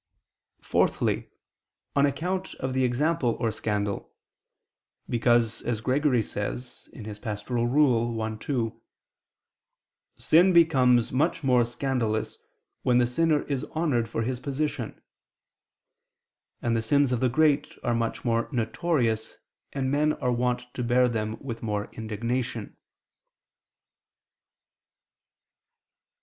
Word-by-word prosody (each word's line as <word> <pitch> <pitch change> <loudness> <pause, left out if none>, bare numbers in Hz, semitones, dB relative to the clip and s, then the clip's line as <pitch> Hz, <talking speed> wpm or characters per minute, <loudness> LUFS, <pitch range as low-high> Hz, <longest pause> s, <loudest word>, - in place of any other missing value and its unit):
Fourthly, - - +1 0.7
on 140 0 +5
account 180 +7 -3
of 130 -1 -3
the 130 0 +1
example 130 0 +1
or 115 -2 0
scandal; 105 -2 -2 1.0
because, 120 -1 +2
as 120 -3 -2
Gregory 130 0 +2
says 120 +5 -6 0.3
(Pastor. 110 +2 -3
i, 120 -4 +2
2): 115 -4 -2 1.4
"Sin 180 +4 +4
becomes 130 -8 +4
much 140 +3 0
more 125 -2 +4
scandalous, 120 -2 -2 0.4
when 125 -1 +3
the 125 - +4
sinner 150 +5 +1
is 140 -3 -3
honored 135 -9 +1
for 115 - -2
his 125 +1 -2
position": 140 -2 -3 1.6
and 115 -1 +1
the 115 - +1
sins 140 +3 +2
of 125 - +1
the 130 - +2
great 145 +2 +2
are 120 - +1
much 115 +1 -2
more 115 -1 +1
notorious 115 -2 0 0.3
and 135 -1 -1
men 150 +2 +2
are 125 - -1
wont 125 0 0
to 125 - -3
bear 125 +1 +3
them 110 -2 -2
with 115 -4 -6
more 105 -2 -3
indignation. 115 +3 -3
125 Hz, 110 wpm, -27 LUFS, 115-140 Hz, 1.6 s, on